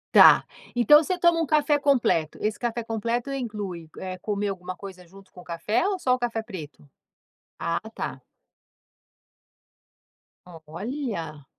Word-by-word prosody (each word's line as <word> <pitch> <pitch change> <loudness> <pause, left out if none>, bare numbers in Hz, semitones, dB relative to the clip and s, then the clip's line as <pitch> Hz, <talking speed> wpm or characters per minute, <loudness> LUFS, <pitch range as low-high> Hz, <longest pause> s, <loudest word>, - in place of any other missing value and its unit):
Tá. - - +9 0.3
Então 295 +6 +6
você 365 +3 -1
toma 340 -1 +4
um 325 - +1
café 295 -1 +3
completo. 250 - +2
Esse 215 0 -1
café 235 -1 -3
completo 230 +3 -2
inclui, 205 -10 -5
eh, 185 -1 -5
comer 205 +2 -2
alguma 185 -2 -4
coisa 185 -1 -10
junto 195 +2 -17
com 180 - -12
o - - -15
café 195 - -1
ou 380 -2 -2
só 255 -1 +2
o - - -8
café 235 -2 -1
preto? 160 -10 -10 0.7
Ah 170 0 -1
tá. - - -5 2.3
Olha. 170 - -6
210 Hz, 140 wpm, -25 LUFS, 180-250 Hz, 2.3 s, Tá